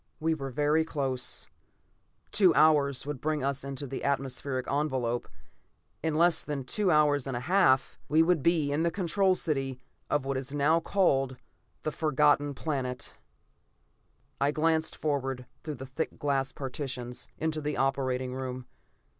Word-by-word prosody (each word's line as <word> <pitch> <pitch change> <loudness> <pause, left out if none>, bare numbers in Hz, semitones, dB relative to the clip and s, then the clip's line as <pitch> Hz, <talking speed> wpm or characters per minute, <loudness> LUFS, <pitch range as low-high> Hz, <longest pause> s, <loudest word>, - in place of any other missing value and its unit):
We 160 +1 +1
were 135 -4 -4
very 150 +4 +2
close; 135 -5 -2 0.8
two 190 -5 +4
hours 145 -3 +4
would 145 -3 -5
bring 155 -2 -1
us 140 -1 -1
into 140 0 -5
the 135 0 -5
atmospheric 135 -1 -1
envelope. 130 -5 -1 0.7
In 160 -1 -1
less 170 0 +4
than 145 -3 -3
two 195 +10 0
hours 150 -4 +3
and 130 -3 -2
a - - -4
half, 175 -5 +3
we 155 +2 +5
would 170 -2 +2
be 155 -2 +2
in 145 +2 +1
the 170 - +2
Control 185 +2 +1
City 135 -7 -1 0.3
of 145 -2 +1
what 135 0 -1
is 135 +2 -4
now 150 +3 +3
called 135 -9 +1 0.5
the 155 - -1
Forgotten 145 -2 +2
Planet! 130 -4 -3 1.2
I 140 - +3
glanced 160 +1 +1
forward, 135 -4 -2 0.2
through 155 -2 -4
the 130 +1 -8
thick 135 +5 -4
glass 135 -2 0
partitions, 130 -2 -5
into 155 -1 -1
the 150 0 -2
operating 130 -2 0
room. 130 -1 -5
145 Hz, 150 wpm, -29 LUFS, 130-155 Hz, 1.2 s, we